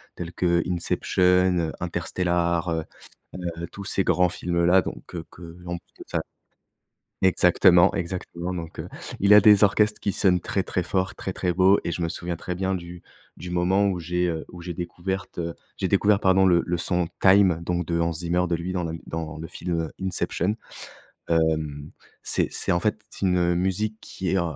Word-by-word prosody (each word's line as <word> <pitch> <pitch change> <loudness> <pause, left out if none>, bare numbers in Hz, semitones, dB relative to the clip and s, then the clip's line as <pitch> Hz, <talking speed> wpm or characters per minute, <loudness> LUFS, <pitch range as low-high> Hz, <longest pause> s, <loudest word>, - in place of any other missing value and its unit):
tels 85 0 -6
que 85 -1 +2
Inception, 90 +1 +2
heu, - - -5
Interstellar, 85 0 -1
heu 80 -1 -1 0.7
heu, 85 0 -5
tous 100 - -7
ces 95 0 0
grands 90 0 +3
films 85 0 -1
là 90 +2 +5
donc - - -7
que 85 -2 -7
que 85 0 -11
on 90 0 -3
peut - - -16 0.2
enfin, - - -2 1.0
exactement, 90 0 +5
exactement 90 -1 -4
donc, 85 -2 -7
heu, - - -7 0.3
il 100 +1 +5
a 105 - +10
des 105 0 +7
orchestres 105 +1 +2
qui 100 - -1
sonnent 90 -2 +2
très, 95 +2 -1
très 90 - -2
fort, 95 +1 -1
très, 95 - -4
très 90 -1 -1
beau 95 +3 +4
et - - -1
je - - -4
me 85 - 0
souviens 85 0 -4
très 90 +2 -5
bien 95 +1 -1
du 85 -1 -7 0.3
du 90 - -8
moment 90 +3 +2
où 95 -3 -1
j'ai, 90 +1 -1
heu, 80 -2 -3
où 90 - -11
j'ai 85 0 -5
découverte 90 +2 -5 0.4
j'ai - - 0
découvert, 105 -1 +3
pardon, 95 0 +4
le 85 -2 +4
le 90 - 0
son 90 0 0
Time 95 -3 +5
donc 90 0 -1
de 85 -1 -1
Hans 85 0 +1
Zimmer, 85 +2 0
de 85 - 0
lui, 85 +2 -4
dans 90 -1 -1
la 85 - -3
m 80 - -6
dans 80 -1 -5
le 80 - -6
film, 85 +1 -3
heu, 80 - -6
Inception. 95 +1 0 0.8
Hem, 80 -3 0 0.3
c'est - - +1
c'est, - - 0
en 85 - +2
fait, 105 +1 0
c'est - - -4
une 90 -1 +2
musique 95 +4 -1
qui 90 -2 -4
est, 95 - +2
heu, - - +2
90 Hz, 200 wpm, -25 LUFS, 85-95 Hz, 1.0 s, a